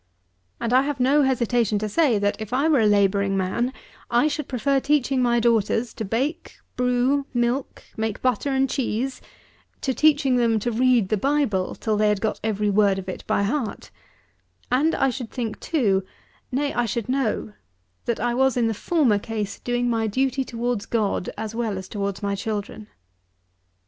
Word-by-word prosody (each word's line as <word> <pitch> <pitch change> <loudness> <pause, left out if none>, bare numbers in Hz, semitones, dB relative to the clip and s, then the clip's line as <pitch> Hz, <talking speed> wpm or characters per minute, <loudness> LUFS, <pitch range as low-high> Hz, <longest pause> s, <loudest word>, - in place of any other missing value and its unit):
And 235 - -1
I 255 - +6
have 280 0 -3
no 275 +4 +4
hesitation 240 -5 +1
to 215 +1 -2
say, 250 +1 +2
that 205 0 +1
if 220 +2 -6
I 275 +5 +2
were 305 -5 +4
a 220 - +4
labouring 200 -1 +2
man, 195 +7 0 0.4
I 240 +5 +3
should 300 -1 -3
prefer 270 +2 +1
teaching 275 -2 +1
my 240 -1 +3
daughters 230 0 +1
to - - -5
bake, 265 - -2 0.2
brew, 250 +3 +1
milk, 240 +3 -1
make 220 -1 -2
butter 255 +2 +1
and 270 0 +2
cheese, 260 0 -2 0.6
to 265 - 0
teaching 285 -3 +3
them 230 -2 +2
to 240 - -1
read 240 -3 +3
the 215 - +1
Bible 265 -7 0
till 215 -2 -1
they 210 0 +3
had 210 -1 +1
got 220 +1 -2
every 210 -1 0
word 200 -1 +3
of 190 -1 -6
it 185 - -6
by 200 - +1
heart; 230 +2 -3 0.8
and 295 +6 +2
I 270 - +2
should 245 -3 -6
think, 230 -4 -4
too, 205 - +1 0.5
nay 280 +3 -1
I 240 -1 0
should 225 +1 -3
know, 255 - -1 0.5
that 235 - -1
I 240 +1 0
was 265 0 +2
in 240 - +2
the 225 - +1
former 245 -3 +2
case 210 -2 -4
doing 245 0 -1
my 225 -2 0
duty 265 +4 0
towards 235 -3 -3
God 210 -5 -1
as 220 0 -4
well 225 -4 -2
as 190 0 -7
towards 200 -1 -4
my 200 0 0
children. 210 +1 -4
235 Hz, 180 wpm, -23 LUFS, 210-265 Hz, 0.8 s, I